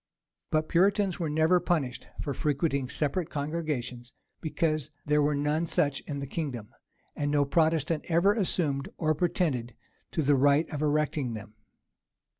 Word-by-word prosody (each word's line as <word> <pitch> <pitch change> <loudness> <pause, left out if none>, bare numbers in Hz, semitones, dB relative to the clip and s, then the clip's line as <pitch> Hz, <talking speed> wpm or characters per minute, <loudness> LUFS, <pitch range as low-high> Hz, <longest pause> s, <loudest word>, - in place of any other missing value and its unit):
But 155 0 +1
Puritans 195 +2 +2
were 165 -3 -1
never 160 +4 +3
punished 155 -8 -1 0.2
for 140 - -2
frequenting 140 -2 0
separate 155 +5 -1
congregations; 145 -5 -3 0.3
because 155 -1 -1 0.2
there 150 0 +3
were 145 0 +2
none 150 +3 0
such 145 -3 +1
in 145 - -3
the 140 - -4
kingdom; 130 -7 -4 0.5
and 145 0 -1
no 145 -1 +3
Protestant 160 +1 +1
ever 175 +4 +4
assumed 165 -9 0
or 155 -1 +2
pretended 150 -7 -1 0.4
to 160 - +1
the 145 +1 +4
right 145 +4 +4
of 150 -2 -3
erecting 150 -4 0
them. 105 0 -9
150 Hz, 145 wpm, -28 LUFS, 140-165 Hz, 0.5 s, ever